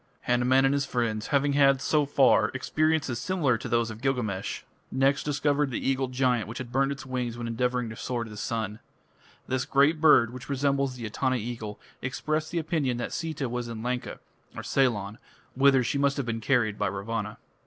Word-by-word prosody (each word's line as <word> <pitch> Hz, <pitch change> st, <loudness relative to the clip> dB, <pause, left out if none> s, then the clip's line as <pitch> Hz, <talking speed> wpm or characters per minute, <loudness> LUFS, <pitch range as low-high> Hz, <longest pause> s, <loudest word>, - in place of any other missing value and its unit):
Hanuman 125 Hz, +2 st, +3 dB
and 135 Hz, -, +3 dB
his 140 Hz, 0 st, +1 dB
friends, 115 Hz, -3 st, -1 dB
having 140 Hz, 0 st, +2 dB
had, 140 Hz, -1 st, +5 dB
so 150 Hz, +1 st, +1 dB
far, 135 Hz, -2 st, +4 dB
experiences 155 Hz, -2 st, 0 dB
similar 165 Hz, -10 st, +1 dB
to -, -, -6 dB
those 115 Hz, -1 st, +1 dB
of 110 Hz, +1 st, -10 dB
Gilgamesh, 120 Hz, -8 st, -2 dB, 0.3 s
next 135 Hz, +2 st, +2 dB
discovered 145 Hz, -1 st, +1 dB
the 125 Hz, -, -3 dB
eagle 135 Hz, 0 st, +1 dB
giant 125 Hz, -3 st, +1 dB
which 115 Hz, +3 st, -7 dB
had 125 Hz, -2 st, -6 dB
burned 135 Hz, +2 st, +2 dB
its 140 Hz, -1 st, -6 dB
wings 125 Hz, -3 st, -3 dB
when 120 Hz, -, -5 dB
endeavouring 125 Hz, +1 st, -1 dB
to 110 Hz, -, -7 dB
soar 120 Hz, +1 st, -3 dB
to 115 Hz, -, -9 dB
the -, -, -9 dB
sun. 110 Hz, 0 st, -3 dB, 0.7 s
This 130 Hz, 0 st, 0 dB
great 145 Hz, +4 st, +3 dB
bird, 125 Hz, -7 st, +6 dB
which 125 Hz, +2 st, -9 dB
resembles 140 Hz, -1 st, 0 dB
the 120 Hz, -2 st, -6 dB
Etana 130 Hz, +4 st, 0 dB
eagle, 115 Hz, -3 st, -5 dB, 0.2 s
expressed 155 Hz, +4 st, -2 dB
the 175 Hz, -, -3 dB
opinion 155 Hz, -7 st, 0 dB
that 120 Hz, -, -4 dB
Sita 160 Hz, -5 st, -3 dB
was 120 Hz, 0 st, -3 dB
in 115 Hz, -1 st, -6 dB
Lanka 125 Hz, 0 st, -3 dB, 0.5 s
(Ceylon), 110 Hz, -6 st, 0 dB, 0.3 s
whither 135 Hz, -1 st, +4 dB
she 140 Hz, -, -1 dB
must 140 Hz, 0 st, +2 dB
have 140 Hz, -, -1 dB
been 115 Hz, -1 st, -3 dB
carried 110 Hz, -3 st, +1 dB
by -, -, +1 dB
Ravana. 105 Hz, +2 st, -4 dB
130 Hz, 190 wpm, -27 LUFS, 115-140 Hz, 0.7 s, bird